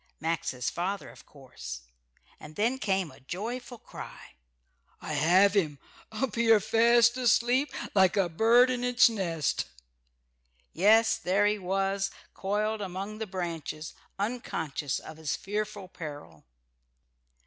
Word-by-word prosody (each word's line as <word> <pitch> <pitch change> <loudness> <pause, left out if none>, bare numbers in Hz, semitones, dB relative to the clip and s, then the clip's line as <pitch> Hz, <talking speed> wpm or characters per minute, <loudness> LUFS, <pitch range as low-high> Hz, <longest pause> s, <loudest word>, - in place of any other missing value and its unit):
Max's 155 -6 -2
father 190 +3 -3
of - - -17
course. 65 - -9 0.6
And 150 +1 -12
then 235 +5 0
came 190 - 0
a 130 - -16
joyful 235 - -6
cry. - - -11 0.7
"I 155 - -5
have 180 +7 +4
him. 160 -8 +1 0.3
Up 225 +2 -2
here 225 -2 +5
fast 235 +3 +4
asleep, 250 +3 +2 0.2
like 190 -1 +4
a 195 -3 +3
bird 230 +9 +4
in 245 -1 -2
its 245 0 +5
nest." 170 -9 -1 1.1
Yes, 225 +5 +4
there 200 -1 +1
he 210 0 +1
was, 195 +1 -1 0.2
coiled 210 +2 -1
among 195 +3 -5
the 220 - -3
branches, 165 -5 -5 0.2
unconscious 175 - -3
of 160 - -10
his 160 -3 -2
fearful 205 -1 -4
peril. 145 - -9
195 Hz, 125 wpm, -28 LUFS, 165-225 Hz, 1.1 s, here